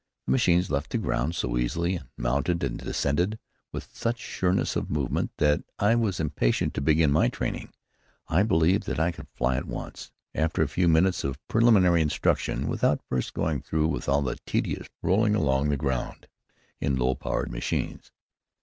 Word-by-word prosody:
The - - -1
machines 90 - +3
left 70 -1 -1
the - - -1
ground 80 +7 -1
so - - -1
easily, 85 +9 0
and 70 -7 -13
mounted 70 +8 0
and 60 -3 -2
descended 90 +10 0 0.3
with - - -8
such 120 +1 -1
sureness 95 -4 -1
of - - -2
movement, 70 -4 -1
that 75 -1 +3 0.2
I 105 +3 +3
was 110 -6 0
impatient 75 -6 0
to - - -2
begin 75 0 +3
my 75 - +4
training. - - -4 0.6
I 90 - +3
believed 95 -2 +2
that - - -2
I 85 +2 +2
could 85 - -11
fly 65 0 +1
at 70 - -4
once, - - -7 0.2
after 80 0 +1
a - - 0
few 90 +4 +1
minutes 85 +3 +3
of 70 -1 -2
preliminary 100 -7 +5
instruction, 75 -1 0
without 75 - +1
first 65 -1 -2
going 75 -4 -1
through 80 0 0
with 80 - -3
all 70 +1 +3
the 65 - -3
tedious - - -1 0.2
rolling 105 +3 +3
along 70 -6 +1
the 70 - +1
ground 65 -3 -3 0.5
in 70 - 0
low 65 0 +1
powered - - -3
machines. - - -3
80 Hz, 175 wpm, -27 LUFS, 70-90 Hz, 0.6 s, preliminary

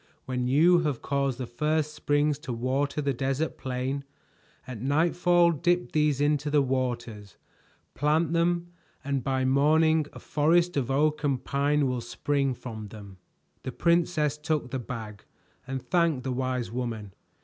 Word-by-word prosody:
When 125 -1 -2
you 165 +7 +5
have 150 -7 -2
caused 140 -2 0
the 130 - -4
first 150 +5 -1
springs 145 -1 +1
to 150 -5 -5
water 135 +5 -1
the 140 -1 +1
desert 135 +5 -1
plain, 130 +2 -3 0.6
at 125 -4 -7
nightfall 170 +5 +3
dip 175 +3 0
these 150 -3 +2
into 145 0 +1
the 145 -1 +3
waters, 120 -6 -3 0.6
plant 155 +3 +1
them 170 +1 +1 0.3
and 140 -2 -1
by 130 0 0
morning 155 +3 +3
a - - -11
forest 170 +4 +2
of 135 -3 -1
oak 150 +3 +1
and 140 -3 0
pine 145 +1 +1
will 125 -1 -2
spring 135 +3 -1
from 110 -3 -7
them." 100 -3 -12 0.4
The 130 - -5
princess 170 -3 +1
took 150 -5 -2
the 130 - -2
bag 110 -4 -7 0.4
and 135 0 -3
thanked 155 +1 +1
the 130 - -2
wise 125 -3 -2
woman. 115 -5 -4
140 Hz, 150 wpm, -27 LUFS, 125-155 Hz, 0.6 s, you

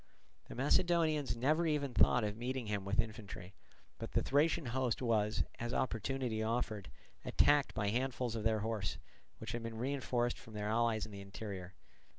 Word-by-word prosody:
The - - -9
Macedonians 155 0 +2
never 155 +8 +2
even 145 -4 0
thought 125 -1 +5
of 105 -1 -1
meeting 125 +2 -3
him 105 -2 -2
with 100 +1 -1
infantry; 105 -4 -3 0.5
but - - -6
the - - +2
Thracian 155 +3 +2
host 125 0 0
was, 110 -4 +2 0.2
as 120 +1 -2
opportunity 120 -1 -1
offered, 110 -3 -1 0.3
attacked 145 -1 +3
by 105 -2 +1
handfuls 125 0 -1
of 110 - -2
their 110 -1 +2
horse, 110 -3 -2 0.4
which 110 0 -6
had 120 - -3
been 115 -1 -5
reinforced 125 -1 0
from 110 - -12
their 105 0 -2
allies 110 -1 +2
in 110 - -11
the 100 -1 -7
interior. 100 -2 -7
115 Hz, 165 wpm, -35 LUFS, 105-130 Hz, 0.5 s, thought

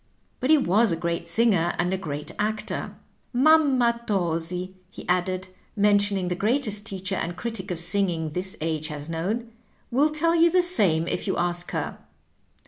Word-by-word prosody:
But 255 - -2
he 315 - +7
was 220 -4 +3
a - - +1
great 170 0 -3
singer 185 -4 +2
and 175 +1 0
a - - +2
great 150 -5 -6
actor. 215 +1 -3 0.4
Mamma 260 -4 +4
Tosi/' 180 -1 -1 0.2
he - - -11
added, 185 +1 -1 0.3
mentioning 205 -2 +2
the 180 - 0
greatest 210 +1 0
teacher 190 -1 -4
and 175 -2 -3
critic 215 -2 -4
of 180 - -3
singing 170 -3 0
this 185 +4 -3
age 155 -1 -2
has 150 +1 -7
known, 185 +9 -2
^^ 235 - -17 0.4
will 280 +6 +3
tell 320 +2 +1
jou 340 0 +5
the 360 +1 +3
same 185 - +4
if - - -3
you - - -1
ask 175 0 -1
her. - - -4
190 Hz, 170 wpm, -25 LUFS, 175-235 Hz, 0.4 s, he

